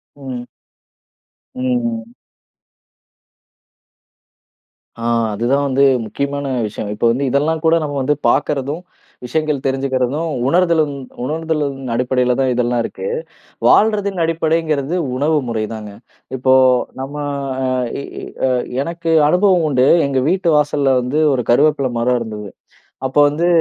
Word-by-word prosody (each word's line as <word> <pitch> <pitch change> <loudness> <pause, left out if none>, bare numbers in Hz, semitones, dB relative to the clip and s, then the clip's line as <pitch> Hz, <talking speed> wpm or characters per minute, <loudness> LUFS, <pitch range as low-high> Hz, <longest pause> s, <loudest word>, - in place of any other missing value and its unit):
ம். 130 -3 -7 1.1
ம், 125 - -5 0.2
ம். 115 0 -5 2.8
ஆ - - -7 0.3
அதுதான் 125 +7 +1
வந்து 135 +1 +3 0.2
முக்கியமான 140 +5 -3 0.2
விஷயம். 105 0 -6
இப்ப 105 - -4
வந்து 135 +4 0
இதெல்லாம் 155 +4 0
கூட 160 +1 +4
நம்ம 145 -2 -3
வந்து 145 +3 +2
பாக்கறதும், 145 +3 0 0.4
விஷயங்கள் 150 +1 -1
தெரிஞ்சுக்கிறதும், 135 +3 -1 0.2
உணர்தலும் 165 -3 +2 0.3
உணர்தலின் 150 -2 -2 0.2
அடிப்படையில 125 0 +1
தான் 130 -1 +2
இதெல்லாம் 120 -1 +1
இருக்கு. 480 - -5 0.6
வாழ்றதின் 200 -4 +3
அடிப்படைங்கிறது 160 -2 0 0.2
உணவு 150 +4 +1
முறைதாங்க. 110 -1 -4 0.5
இப்போ 130 +1 +3 0.5
நம்ம 135 +2 -6 0.9
எ - - -7 0.2
எ 130 - -2 0.3
எனக்கு 170 0 -3 0.2
அனுபவம் 180 -1 +3
உண்டு. 130 -1 +3 0.2
எங்க 135 -1 0
வீட்டு 185 -1 +1
வாசல்ல 145 -2 +2
வந்து 135 +5 0
ஒரு 125 - 0
கருவேப்பில 140 +1 +3
மரம் 125 +1 +1
இருந்தது. 105 -3 -6 0.6
அப்போ 130 +2 +1
வந்து 165 +4 0
140 Hz, 110 wpm, -18 LUFS, 125-160 Hz, 2.8 s, கூட